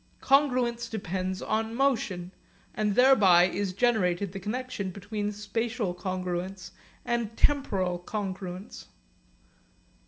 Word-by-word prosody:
Congruence 250 -4 +2
depends 185 -2 -3
on 220 +1 -1
motion, 220 -9 0 0.4
and 210 -2 0
thereby 215 -9 +6
is 195 +1 -2
generated 200 -4 +1
the 195 - -6
connexion 210 -1 -3
between 205 +2 -4
spatial 215 0 -2
congruence 185 0 -4 0.3
and 235 -2 -2
temporal 190 -11 +1
congruence. 190 -1 -5
205 Hz, 95 wpm, -28 LUFS, 185-235 Hz, 0.4 s, thereby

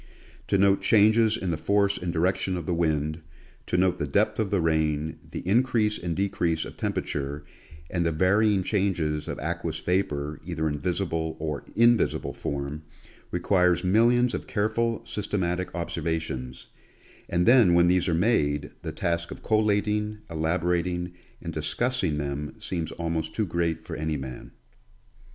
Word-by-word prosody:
To - - +2
note 100 0 +4
changes 110 +1 +4
in 95 -6 -2
the 80 - -1
force 100 +4 +2
and 90 -1 -3
direction 90 +2 0
of 85 - -5
the 90 - -1
wind, 80 -1 0 0.5
to 90 - 0
note 90 0 +2
the - - -1
depth - - +1
of 110 -3 0
the 100 - +1
rain, 80 -2 0
the - - -6
increase 110 0 +2
and 85 -1 -3
decrease 85 -4 0
of - - -9
temperature 70 +1 -3 0.4
and 85 +1 -1
the 85 - +1
varying 95 +4 +3
changes 85 -7 0
of - - -4
aqueous 85 +1 -3
vapor, 75 -5 -1
either 80 -3 -2
in 75 -1 -2
visible 85 -3 -2
or 75 -2 -4
invisible 115 0 +3
form, 70 +2 -4 0.5
requires 90 0 +2
millions 120 +6 +3
of - - -4
careful, 115 +2 0
systematic 90 -3 -2
observa 85 -1 -2
tions, 65 -5 -6 0.6
and 85 +1 +1
then 115 -8 +6
when 85 0 +5
these 90 0 +2
are 85 - +2
made, 75 -7 +1
the - - -4
task 85 0 -2
of - - -9
collating, 105 0 +1
elabo 80 +2 -1
rating 90 0 -1 0.3
and 85 -1 -5
discussing 80 +3 0
them 75 0 -4
seems 85 -3 -4
almost 80 -1 -3
too 110 - +1
great 85 -2 -1
for - - -6
any 80 0 -2
man. 65 -2 -7
85 Hz, 155 wpm, -26 LUFS, 80-100 Hz, 0.6 s, then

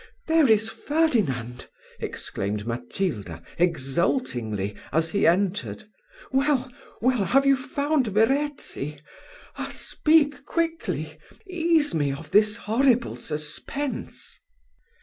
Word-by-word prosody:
"There 320 -5 +4
is 220 0 +4
Ferdinand!" 210 - 0 0.3
exclaimed 105 +1 -3
Matilda, 115 - -3 0.2
exultingly, 130 - 0 0.2
as 160 +1 +1
he 200 - +3
entered 195 +5 +1 0.5
"Well, 265 -1 +1 0.3
well! 250 -3 +2
have 275 +5 +3
you 275 0 +6
found 280 0 0
Verezzi? 225 - 0 0.6
Ah! - - -4
speak 300 -2 +2
quickly! 330 +1 -2 0.3
ease 335 -4 +1
me 145 -3 +1
of 150 +3 -8
this 210 +1 +4
horrible 235 +2 +2
suspense." 155 - -5
220 Hz, 95 wpm, -25 LUFS, -, 0.6 s, you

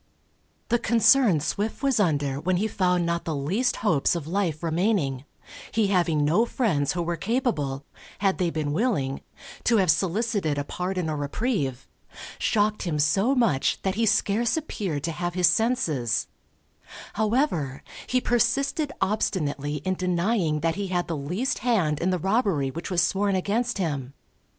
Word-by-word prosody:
The 240 +1 +2
concern 230 - +4
Swift 210 - -3
was 270 -4 +2
under 145 -7 +1
when 180 +4 0
he 210 +4 0
found 180 -4 +1
not 170 0 -1
the 165 -3 -3
least 195 - 0
hopes 160 -5 +2
of 165 -4 -4
life 170 -2 -1
remaining, 165 - 0 0.5
he 220 -3 +1
having 170 -6 +2
no 170 +10 +3
friends 195 - 0
who 175 -1 -2
were 170 0 -2
capable 165 - -1 0.3
(had 195 -1 0
they 180 -2 +1
been 155 -3 -2
willing) 160 - 0 0.4
to 235 - +4
have 185 -5 +4
solicited 190 -2 0
a 145 - -1
pardon 180 +3 -3
or 155 - -2
reprieve, 145 - -2 0.5
shocked 210 -1 +1
him 165 -4 -2
so 195 - +2
much 225 - +2
that 190 - 0
he 225 +2 +1
scarce 220 +4 +2
appeared 190 - -3
to 165 - -1
have 175 +2 -4
his 180 -1 +3
senses; 175 - +1 0.9
however, 210 - 0 0.2
he 255 - +2
persisted 275 +5 +1
obstinately 150 -8 -1
in 185 - +1
denying 180 -3 0
that 165 +1 +1
he 200 +1 -3
had 180 -1 -1
the 165 - -2
least 180 - -2
hand 180 - +1
in 180 - 0
the 185 - +1
robbery 190 - +1
which 165 +6 -6
was 175 -3 +2
sworn 195 +2 +1
against 220 +6 -1
him. 140 -7 -3
180 Hz, 160 wpm, -25 LUFS, 150-220 Hz, 0.9 s, concern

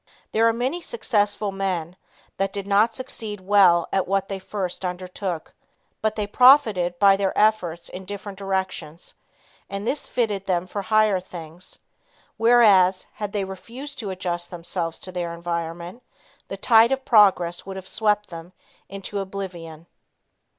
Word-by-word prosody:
There 225 +1 +3
are - - +4
many 255 +9 -2
successful 210 - 0
men, 185 -3 -3 0.4
that 195 0 0
did 200 -1 -5
not 210 +3 +3
succeed 220 -5 -6
well 185 -3 +4
at 190 - +1
what 195 0 0
they 195 -1 -4
first 190 -1 -4
undertook, 180 -1 -5 0.5
but 220 0 0
they 210 - -1
profited 210 -7 +5
by 195 +1 +6
their 195 -1 -1
efforts 180 -6 +1
in 190 +1 -9
different 200 0 -7
directions, 190 -4 -4 0.6
and 200 +1 -5
this 280 +5 -2
fitted 205 -5 -1
them 180 -2 0
for 200 +2 -4
higher 215 -1 +3
things, 175 -1 -11 0.6
whereas 210 -6 +5
had 210 -2 -5
they 205 -1 -1
refused 235 +10 -8
to 210 - -4
adjust 175 -2 -4
themselves 170 -1 -4
to 185 - -6
their 175 -2 -4
environment, 170 +4 -5 0.5
the 195 - -6
tide 225 +4 +5
of 270 0 -1
progress 190 -7 +4
would 195 - -6
have 190 -1 -8
swept 210 0 +1
them 170 +2 -9 0.4
into 195 +1 -5
oblivion. 175 -5 -7
195 Hz, 150 wpm, -23 LUFS, 180-210 Hz, 0.6 s, by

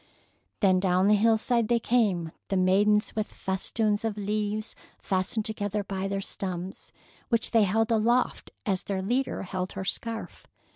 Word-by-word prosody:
Then 190 -3 +4
down 185 0 +2
the 210 - +6
hillside 225 +2 +3
they 240 +1 +3
came, 205 -9 +1 0.2
the 195 - 0
maidens 205 +4 +3
with 215 -1 -2
festoons 205 +3 -1
of 220 -2 -2
leaves 210 +1 -2 0.2
fastened 195 +3 -1
together 205 -1 -2
by 195 0 -3
their 195 0 -2
stems, 185 -1 -5 0.4
which 230 -2 +1
they 225 -3 +5
held 225 +4 +1
aloft 235 +3 +1 0.2
as 190 -3 +1
their 190 -2 -3
leader 250 +4 -1
held 185 0 -4
her 190 0 -5
scarf. 225 +3 -4
205 Hz, 150 wpm, -27 LUFS, 190-225 Hz, 0.4 s, the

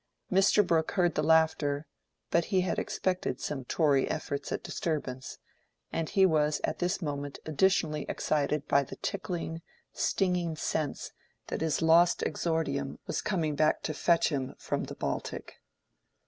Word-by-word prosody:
Mr. 195 +2 +5
Brooke 165 -3 +1
heard 175 -3 +2
the - - 0
laughter; 155 -2 +2 0.5
but 170 0 +3
he 190 -3 +2
had 180 - -1
expected 180 -8 -1
some 135 -4 -4
Tory 140 -1 +2
efforts 140 0 -3
at - - -2
disturbance, 130 -5 -3 0.6
and 165 -1 -1
he 195 -1 +4
was 155 -3 +2
at - - -1
this 180 +2 -1
moment 145 -2 -4
additionally 160 -1 +1
excited 150 0 0
by 140 - +4
the 135 - -7
tickling, 175 -4 -4 0.3
stinging 180 -4 0
sense 155 -2 -2 0.4
that - - -3
his 160 0 0
lost 170 +2 +5
exordium 140 -5 -1
was - - -2
coming 165 -7 0
back 155 +1 +2
to 155 - -2
fetch 170 +3 +3
him 135 -3 -3
from - - -2
the - - -8
Baltic. - - -4
160 Hz, 145 wpm, -30 LUFS, 145-175 Hz, 0.6 s, Mr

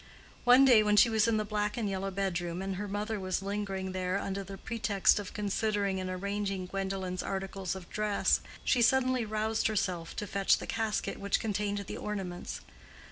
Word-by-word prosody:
One 250 +2 +8
day 245 -5 +7
when 210 -1 +3
she 230 - +7
was 220 0 +3
in 225 -1 +2
the 215 - 0
black 210 +1 -1
and 225 -3 -1
yellow 195 0 -2
bedroom 185 -2 -2
and 195 -1 -3
her 205 +1 -3
mother 210 +2 -2
was 185 0 -2
lingering 195 -2 -3
there 185 0 -1
under 195 0 -3
the 195 0 -8
pretext 215 -3 +2
of 205 - -6
considering 205 -2 0
and 185 0 -3
arranging 195 0 -2
Gwendolen's 190 -1 -3
articles 195 -1 -3
of 185 -2 -9
dress, 210 -1 +1 0.2
she 250 - +3
suddenly 255 0 +3
roused 215 +1 0
herself 185 -6 -2
to 210 - -3
fetch 200 -1 +2
the - - -6
casket 220 -2 -2
which 200 0 +1
contained 205 -1 -1
the - - -6
ornaments. 190 -4 -5
200 Hz, 185 wpm, -31 LUFS, 190-215 Hz, 0.2 s, One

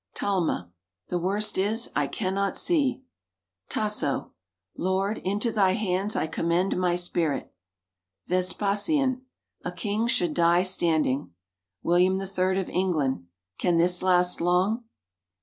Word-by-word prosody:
Talma. 170 - -1 0.4
"The 175 - 0
worst 200 +3 -1
is, 220 +4 0
I 145 -1 +2
cannot 195 +3 -1
see." 275 -7 +1 0.7
Tasso. 210 -10 -1 0.4
"Lord, 190 +3 0
into 205 +5 -1
Thy 195 -4 +3
hands 200 0 -1
I - - +1
commend 170 +4 0
my 180 -1 +1
spirit!" 175 -4 -2 0.7
Vespasian. 210 - 0 0.4
"A 180 - -3
king 210 +5 -1
should 180 -10 +1
die 170 +2 +4
standing." 160 - +1 0.5
William 180 +2 +3
III 190 -1 0
of 185 - -6
England. 150 - 0 0.3
"Can 175 -2 +2
this 175 +1 +2
last 180 -1 +3
long?" 185 +7 +2
185 Hz, 115 wpm, -26 LUFS, 175-205 Hz, 0.7 s, die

